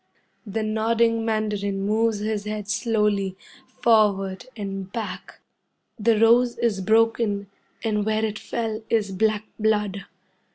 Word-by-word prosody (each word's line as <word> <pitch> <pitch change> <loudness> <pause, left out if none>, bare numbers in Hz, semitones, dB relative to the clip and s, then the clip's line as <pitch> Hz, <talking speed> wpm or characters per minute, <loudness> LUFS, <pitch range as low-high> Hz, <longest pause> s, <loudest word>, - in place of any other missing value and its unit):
The 215 +2 -2
nodding 225 +1 +1
mandarin 210 -3 -1
moves 215 0 +1
his 210 -1 -2
head 210 -1 -4
slowly, 210 -4 0 0.3
forward 215 -4 +2
and 195 -2 -5
back. 220 0 -6 0.6
The 220 0 +3
rose 235 +2 +4
is 215 -5 0
broken, 220 -1 +2 0.3
and 210 -2 0
where 220 +1 +1
it 210 -1 -4
fell 225 -2 -3
is 210 -3 +1
black 215 +2 +1
blood. 210 -2 0
215 Hz, 120 wpm, -24 LUFS, 205-225 Hz, 0.6 s, rose